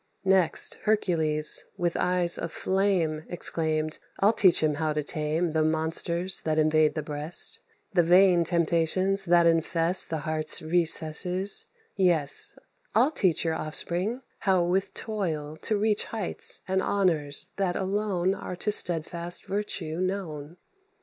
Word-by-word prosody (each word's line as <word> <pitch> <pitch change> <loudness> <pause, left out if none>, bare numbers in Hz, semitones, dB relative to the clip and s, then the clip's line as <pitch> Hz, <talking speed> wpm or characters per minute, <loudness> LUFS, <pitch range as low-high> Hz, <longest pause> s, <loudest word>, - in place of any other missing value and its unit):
Next 190 -3 +3
Hercules, 160 -8 +2
with 175 -2 -1
eyes 180 -1 0
of 170 - -5
flame, 185 -6 0
Exclaimed, 155 -2 -1 0.2
"I'll 205 +3 +4
teach 185 -7 +4
him 155 -1 +2
how 155 -1 0
to 150 0 -2
tame 155 +3 -2
The 160 0 0
monsters 165 +3 0
that 155 -1 -1
invade 155 -1 +2
the 155 - -3
breast, 150 +3 -2 0.3
The 175 - +4
vain 175 +1 +4
temptations 170 +3 +1
that 175 -1 +4
infest 165 +2 +2
The 160 -2 -3
heart's 155 0 +2
recesses; 175 +3 +2 0.3
yes, 175 -7 +2 0.4
I'll 250 +7 +4
teach 185 - 0
Your 165 - 0
offspring 175 +10 -3 0.2
how 190 -4 +2
with 185 +3 -1
toil 160 -9 -4
to 215 - 0
reach 210 0 0
Heights 215 -5 -2
and 190 0 0
honours 165 -9 -1
that 190 -3 -1
alone 190 -1 -1
Are 180 - -7
to 210 +4 -2
steadfast 170 -2 -2
virtue 190 -5 -4
known." 175 -5 -4
175 Hz, 135 wpm, -26 LUFS, 155-190 Hz, 0.4 s, I'll